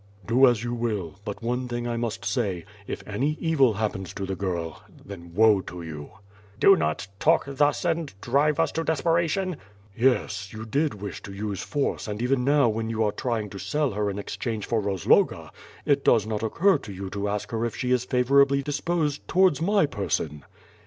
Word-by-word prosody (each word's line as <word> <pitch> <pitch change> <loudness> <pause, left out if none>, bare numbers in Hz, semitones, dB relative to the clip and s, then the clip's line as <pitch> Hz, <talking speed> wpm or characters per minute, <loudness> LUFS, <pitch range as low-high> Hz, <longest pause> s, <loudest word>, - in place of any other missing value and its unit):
"Do 125 +6 +5
as 120 -2 +2
you 120 0 -2
will, 105 -7 -3
but 105 +2 -6
one 125 +2 -1
thing 120 0 -3
I 120 - -2
must 115 -1 -3
say, 100 -9 -1 0.2
if - - -6
any 135 +9 -1
evil 140 -8 +3
hap 110 +1 0
pens 95 -2 -7
to 100 - -3
the 95 0 -3
girl 85 -4 -3
— - - -19
then 85 -4 -10
woe 110 -2 +5
to 90 -2 -8
you!" 75 -3 -7 0.5
"Do 195 - +7
not 110 - -1
talk 165 +1 +4
thus 145 +4 +1
and 165 -3 0
drive 140 +6 +1
us - - +2
to 165 - -2
desperation." 170 +2 0 0.4
"Yes, 105 -6 +1
you 110 0 -7
did 140 +4 0
wish 100 -2 -7
to 100 - -9
use 100 0 -4
force 145 -5 -2
and 105 0 -4
even 125 +1 +1
now 140 -1 +4
when 110 0 -1
you 110 0 0
are 105 - +1
trying 110 -3 -3
to 100 - -7
sell 140 +9 0
her 105 0 -1
in 100 - -4
exchange 110 +1 -4
for 115 -2 0
Rozloga, 100 -4 +2 0.3
it 140 -1 +2
does 110 -3 +4
not 110 -1 -3
occur 165 - +3
to 105 - -9
you 95 0 -6
to 100 0 -2
ask 100 0 -3
her 115 0 -1
if 120 - -2
she 125 -1 -2
is 125 -1 +3
favorably 140 +2 +3
disposed 150 +1 -1
towards 180 -5 +3
my 200 +1 +3
person." 80 - -3
115 Hz, 200 wpm, -26 LUFS, 100-140 Hz, 0.5 s, Do